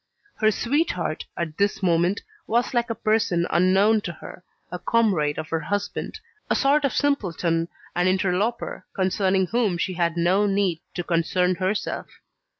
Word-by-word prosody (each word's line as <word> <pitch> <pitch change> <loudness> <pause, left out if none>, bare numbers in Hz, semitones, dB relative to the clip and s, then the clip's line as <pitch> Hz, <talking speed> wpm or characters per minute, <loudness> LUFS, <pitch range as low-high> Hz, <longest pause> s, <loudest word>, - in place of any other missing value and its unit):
Her 215 - +4
sweetheart, 225 - -1
at 165 -1 -4
this 200 0 +1
moment, 175 +2 +2 0.3
was 240 +3 +1
like 240 0 +1
a 230 - -2
person 215 -6 +1
unknown 190 +5 +4
to 180 - -4
her, 180 - -11 0.3
a 180 - -4
comrade 185 -12 +1
of 155 - -5
her 165 - 0
husband, 205 +6 -3 0.3
a - - +2
sort 285 +2 +3
of 275 - +1
simpleton 170 - 0 0.3
and 175 +1 +2
interloper 195 +5 -1
concerning 190 0 +1
whom 215 -3 0
she 185 +2 -1
had 170 -1 0
no 185 +5 +3
need 195 -4 +1 0.2
to 175 - -2
concern 180 +2 +1
herself. 185 +3 -2
190 Hz, 150 wpm, -24 LUFS, 175-215 Hz, 0.3 s, Her